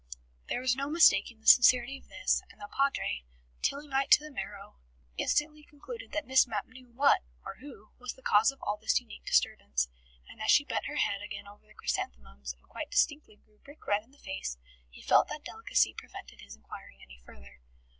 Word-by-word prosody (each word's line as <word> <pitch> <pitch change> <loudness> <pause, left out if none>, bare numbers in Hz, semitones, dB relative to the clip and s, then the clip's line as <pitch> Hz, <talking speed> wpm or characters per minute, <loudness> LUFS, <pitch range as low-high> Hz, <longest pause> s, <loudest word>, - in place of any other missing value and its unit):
There 245 - -1
was 255 -1 +2
no 275 +2 -3
mistaking 235 -8 +4
the - - -26
sincerity 250 +1 +7
of - - -23
this, - - 0
and - - -18
the 275 - -8
Padre, 275 - 0 0.4
Tillingite 275 -1 -1
to 300 - +6
the 305 - -9
marrow, 205 -6 -7 0.4
instantly 300 - 0
concluded 460 +13 -10
that 310 - -2
Miss 260 0 +4
Mapp 210 -4 -3
knew 255 0 -16
what 275 +4 +4 0.2
(or - - -7
who) 250 -6 -13
was 250 0 -5
the 260 - -20
cause 215 +5 +4
of 275 - -19
all 205 +1 -1
this 220 +1 +2
unique 245 -3 -13
disturbance. - - +1 0.4
And - - -13
as 220 - -2
she 285 - +6
bent - - -2
her 295 - -5
head 200 -8 0
again 205 -1 -7
over 205 +1 -16
the 215 - -20
chrysanthemums, 65 +1 -4
and - - -18
quite - - -6
distinctly 295 -7 0
grew 210 0 -32
brick 285 +2 -16
red 205 +1 +1
in 225 - -27
the 280 - -23
face, 130 - -5 0.3
he - - -15
felt - - +5
that - - -7
delicacy - - +1
prevented - - -11
his 70 +1 -11
inquiring 70 -2 -12
any 65 -1 -15
further. 65 +2 -16
235 Hz, 200 wpm, -30 LUFS, 200-275 Hz, 0.4 s, sincerity